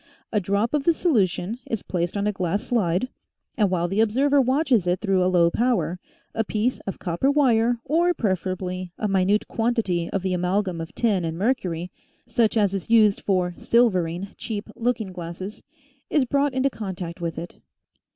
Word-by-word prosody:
A 210 - +2
drop 200 +5 0
of 295 -2 +1
the 335 - +4
solution 220 - 0
is 225 - -2
placed 175 +1 -2
on 200 - 0
a 210 - +2
glass 190 +1 -2
slide 200 -2 0 0.5
and 210 -6 +2
while 175 -2 0
the 195 +5 +1
observer 275 +6 +3
watches 255 - +2
it 180 +1 +1
through 195 -3 +2
a 180 - +3
low 170 -2 +4
power, 230 -7 0 0.3
a 225 - 0
piece 220 +4 -1
of 195 - -3
copper 175 +10 0
wire 245 -5 +3
or, 335 +5 +3
preferably, 185 -2 -2
a 215 - -1
minute 195 +1 +2
quantity 225 -8 0
of 195 - -2
the 190 -1 0
amalgam 180 0 0
of 165 - -8
tin 210 -6 +1
and 165 0 -3
mercury, 180 -6 -1 0.3
such' 230 -1 +1
as 200 -3 +2
is 195 0 -4
used 215 -3 +5
for 180 -3 0
" - - -25
silvering 190 -6 +2
" - - -34
cheap 215 -2 -5
looking 230 -5 -1
glasses, 180 +3 -7 0.5
is 290 -4 +2
brought 280 +1 +1
into 265 +1 +2
contact 185 -5 -6
with 165 -2 -3
it. 170 +2 -7
200 Hz, 180 wpm, -24 LUFS, 180-235 Hz, 0.5 s, used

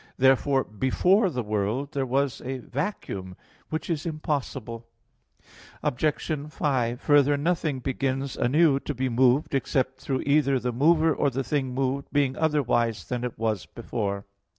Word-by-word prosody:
Therefore 135 +1 +4
before 180 - +2
the 125 -7 -3
world 105 +7 -1
there 135 -3 -1
was 135 +1 0
a 130 +1 -3
vacuum; 120 - -4 0.3
which 160 +1 -3
is 160 -4 -2
impossible. 135 -7 -4 1.0
Obj. 150 +1 0 0.3
5: 125 -6 0
Further, 145 -1 +4
nothing 155 -2 0
begins 135 +1 -2
anew 145 +2 +3
to 145 - -5
be 130 +1 -1
moved 130 +5 +3
except 135 -1 0
through 130 -2 -2
either 140 -2 +3
the 125 0 -2
mover 160 +5 +4
or 145 - +1
the 135 +1 -2
thing 130 -1 -1
moved 135 +1 -1
being 140 -2 +1
otherwise 125 -8 0
than 125 -1 -2
it 125 -1 -4
was 110 -3 -1
before. 100 -4 -4
135 Hz, 145 wpm, -26 LUFS, 125-145 Hz, 1.0 s, Therefore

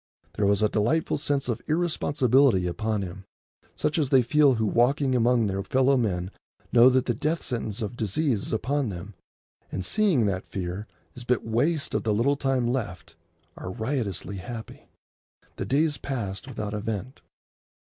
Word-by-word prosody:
There 100 - +1
was 100 +1 +2
a - - +5
delightful 120 +12 0
sense 140 -2 -1
of 120 -2 -2
irresponsibility 140 - +2
upon 105 +4 -1
him, 95 +1 -8 0.5
such 155 - 0
as 145 -4 +1
they 130 -2 +5
feel 140 +2 +4
who 110 -1 0
walking 130 +5 +2
among 120 -1 +3
their 100 -1 -1
fellow 130 +7 +2
men 95 -7 -1 0.4
know 120 +1 +8
that 130 0 +2
the 120 - +1
death 155 +8 -1
sentence 115 -2 -3
of 105 +3 -4
disease 110 - 0
is - - -7
upon 130 +3 0
them, 95 +2 -7 0.6
and, 95 - -3
seeing 190 - +3
that 95 -2 -2
fear 95 +3 -5 0.3
is 125 - -9
but 125 0 0
waste 140 +8 0
of - - +1
the 110 -2 0
little 135 +6 +2
time 135 -3 0
left, 120 -8 -3 0.4
are - - -7
riotously 110 -4 -3
happy. 110 +3 -8 0.7
The - - -3
days 150 +2 +1
passed 115 -6 -4
without 110 -5 -5
event. 110 +4 -4
120 Hz, 165 wpm, -26 LUFS, 105-135 Hz, 0.7 s, know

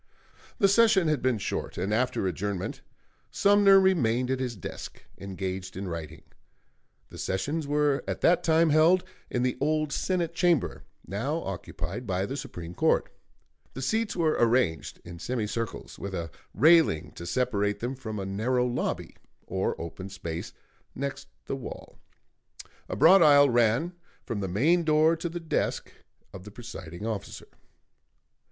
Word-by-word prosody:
The 200 - +4
session 200 -3 +4
had 150 -4 0
been 130 -3 +1
short, 100 - -4
and 95 +4 -1
after 125 -3 0
adjournment 95 +1 -3 0.5
Sumner 200 -1 +5
remained 130 -10 +2
at 130 - 0
his 125 -3 -3
desk, 95 - -8 0.2
engaged 95 -1 -5
in 95 0 -4
writing. 80 -2 -6 0.9
The - - -11
sessions 145 +11 -2
were 145 -1 +1
at - - -3
that 175 +1 +4
time 165 -1 +4
held 165 +4 +5 0.3
in 125 - -1
the 125 0 -1
old 155 0 +1
Senate 175 -3 -1
Chamber, 175 -5 +1 0.2
now 135 - -2
occupied 95 +3 -5
by 95 0 0
the 135 - -4
Supreme 90 - -7
Court. - - +1 0.6
The 135 - -5
seats 220 - 0
were 160 -3 +2
arranged 115 - +1
in 85 0 -9
semicircles, 115 0 -4
with 100 -1 -5
a 85 -2 -4 0.2
railing 160 - +4
to 85 - -9
separate 105 -1 0
them 120 +3 -3
from 110 -5 -6
a 95 - -3
narrow 120 +6 0
lobby 125 0 -3 0.3
or - - -2
open 95 +3 -7
space 85 -4 -6 0.4
next 140 +1 -4 0.2
the - - -3
wall; 135 - -9 0.9
a - - -3
broad 180 - +7
aisle 145 -3 +7
ran 120 +8 +2 0.3
from 115 - -3
the 95 - -2
main 150 - +2
door 155 +1 +4
to 170 +1 -3
the 175 +1 -5
desk 165 -3 -2 0.4
of 95 -2 -9
the 105 - -10
presiding 100 -5 -8
officer. 110 -3 -5
125 Hz, 150 wpm, -27 LUFS, 95-155 Hz, 0.9 s, broad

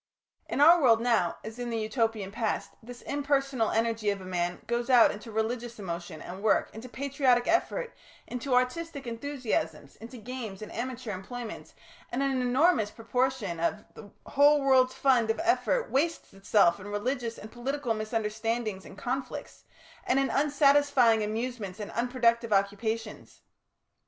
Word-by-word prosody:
In - - -1
our 335 +3 +8
world 230 -5 +5
now, 230 -7 +1
as 220 +2 -8
in 245 -1 -3
the 230 - -2
Utopian 220 -3 -1
past, 220 0 -2
this 245 +2 -11
impersonal 275 -4 0
energy 225 -1 0
of 200 -1 -1
a 185 - -10
man 175 -1 -2
goes 240 +1 -2
out 245 -3 +7
into 210 +2 -9
religious 230 +2 -2
emotion 170 -5 -6
and 185 +2 -8
work, 215 - +2
into 225 +3 -9
patriotic 260 -2 +1
effort, 465 +8 0 0.3
into 250 +1 -2
artistic 280 +3 -1
enthusiasms, 230 - -3
into 235 +3 -10
games 220 -3 -7
and 215 - -9
amateur 250 -1 -4
employments, 220 +4 -7 0.4
and 255 +3 -1
an 275 - +1
enormous 250 -1 +3
proportion 230 -5 -2
of 170 +5 -1
the 205 - -12 0.2
whole 290 +1 +4
world's 260 -2 +4
fund 250 -5 +3
of 225 - 0
effort 375 +7 +1
wastes 320 +5 -1
itself 195 -2 +3
in 195 - -9
religious 230 +3 -2
and 215 - -10
political 255 0 -2
misunderstandings 220 -1 -2
and - - -12
conflicts, 260 +4 -5 0.4
and 260 - +3
in 275 0 +1
unsatisfying 280 -5 +4
amusements 220 -2 -4
and 210 - -6
unproductive 235 -1 +1
occupations. 205 +3 -2
235 Hz, 150 wpm, -28 LUFS, 215-265 Hz, 0.4 s, our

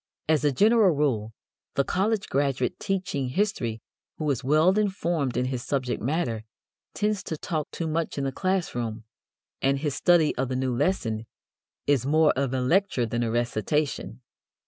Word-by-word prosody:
As 155 -2 +2
a 145 - +3
general 210 - +4
rule 120 -7 0 0.4
the 140 - +3
college 205 +6 0
graduate 135 -3 0
teaching 185 -9 -2
history 125 - -1 0.3
who 155 - -2
is 135 0 -2
well 155 +7 +4
informed 170 - 0
in 125 - +1
his 130 -1 -2
subject 130 -2 -2
matter 120 -4 -1 0.5
tends 210 -1 0
to 160 - -4
talk 155 -1 -3
too 165 - -4
much 160 0 -2
in 140 - -1
the 135 - -1
class 185 +2 -1
room, 115 -2 -3 0.6
and 135 +1 +2
his 145 0 -2
study 165 0 +3
of 130 0 -1
the 130 - -2
new 130 -1 0
lesson 115 - 0 0.6
is 140 -5 +2
more 155 +3 +4
of 135 -1 0
a 130 -1 0
lecture 165 -2 +2
than 120 +1 -2
a 115 - 0
recitation. 120 +5 -1
140 Hz, 170 wpm, -26 LUFS, 125-175 Hz, 0.6 s, general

